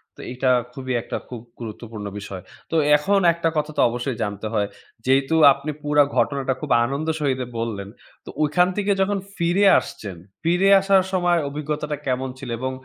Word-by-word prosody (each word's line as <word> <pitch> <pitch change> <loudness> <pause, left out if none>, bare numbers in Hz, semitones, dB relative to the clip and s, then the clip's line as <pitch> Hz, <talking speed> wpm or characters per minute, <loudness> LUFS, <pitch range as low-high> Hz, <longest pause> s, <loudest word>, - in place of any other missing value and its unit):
তো - - -12
এটা 130 0 +1 0.2
খুবই 130 -1 -4
একটা - - -5
খুব 120 -3 -7 0.2
গুরুত্বপূর্ণ 110 -2 -7
বিষয়। 100 -2 -7 0.3
তো - - -1 0.2
এখন 195 +7 +2
একটা 165 0 0
কথা 150 0 -1
তো - - +4
অবশ্যই 120 +1 -3
জানতে 100 +1 -4
হয়। 105 -2 +1 0.4
যেহেতু 135 +4 +2 0.2
আপনি 140 +3 -5
পুরা 145 0 +4
ঘটনাটা 135 -2 +1
খুব 150 - -5 0.2
আনন্দের 155 +5 -2
সহীতে 130 -4 -1
বললেন, 105 -4 -4 0.4
তো - - -10
ঐখান 165 +4 +3
থেকে 205 0 +1
যখন 200 +1 +1 0.2
ফিরে 175 +4 +2
আসছেন, 100 -4 -8 0.3
ফিরে 175 +4 +2
আসার 195 -1 +4
সময় 175 -2 +2
অভিজ্ঞতাটা 150 +1 -3
কেমন 130 0 -1
ছিল 135 -3 -7
এবং 130 +1 -2
140 Hz, 170 wpm, -22 LUFS, 125-165 Hz, 0.4 s, তো